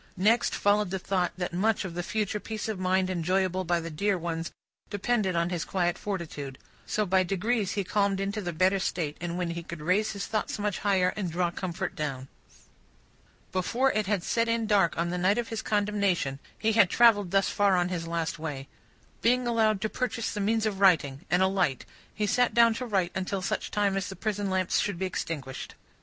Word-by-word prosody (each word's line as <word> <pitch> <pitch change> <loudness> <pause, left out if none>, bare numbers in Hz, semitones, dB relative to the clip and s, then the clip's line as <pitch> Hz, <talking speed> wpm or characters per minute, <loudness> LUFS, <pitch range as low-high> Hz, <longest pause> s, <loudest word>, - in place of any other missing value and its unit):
Next 215 +6 +3
followed 205 -1 +2
the 190 - -2
thought 185 -1 0
that 180 -2 -3
much 210 +3 +1
of 180 - -5
the 175 - -2
future 210 +2 -2
peace 220 +1 -5
of 215 -4 -3
mind 185 0 +2
enjoyable 185 +1 0
by 175 -1 +1
the 165 0 -6
dear 200 +5 0
ones, 165 -1 -4 0.4
depended 205 -2 0
on 170 +1 +1
his 175 -3 -1
quiet 175 -2 0
fortitude. 155 -9 -5 0.3
So, 215 - 0
by 190 0 +3
degrees 195 +3 0
he 200 - -1
calmed 200 0 +1
into 200 +2 -2
the 175 -3 -3
better 185 +4 +2
state, 160 -5 -2
when 175 0 -2
he 170 0 -4
could 170 -1 -8
raise 185 +9 +1
his 200 -1 -4
thoughts 215 -1 -2
much 205 -2 -2
higher, 190 -3 +2
and 190 -5 -3
draw 175 +1 0
comfort 175 -1 -4
down. 135 -3 -4 1.2
Before 235 +8 +1
it 215 -2 -1
had 200 -4 0
set 230 +4 +1
in 230 -1 +1
dark 200 -5 +3
on 170 +1 0
the 180 - -2
night 190 +4 +3
of 240 -1 -2
his 225 -1 -3
condemnation, 200 -9 0 0.2
he 220 0 +1
had 210 -4 +5
travelled 210 -5 +5
thus 195 +1 +2
far 200 -2 +3
on 175 0 +1
his 170 -2 -3
last 165 -1 -2
way. 145 -4 -5 0.5
Being 250 +2 +3
allowed 220 -3 +2
to 220 - +1
purchase 230 0 -2
the 210 - -3
means 220 +2 +1
of 205 -3 -2
writing, 160 -6 +3
and 180 +1 +3
a - - +5
light, 180 -9 0 0.3
he 210 - -2
sat 245 +1 +2
down 235 -1 +6
to 250 +2 -4
write 190 -5 +1
until 190 0 -2
such - - -2
time 205 -2 +1
as 195 -1 -2
the 190 - -7
prison 205 -2 -2
lamps 185 -1 +1
should 205 -4 -1
be 190 - -1
extinguished. 145 -7 -5
190 Hz, 210 wpm, -28 LUFS, 175-210 Hz, 1.2 s, down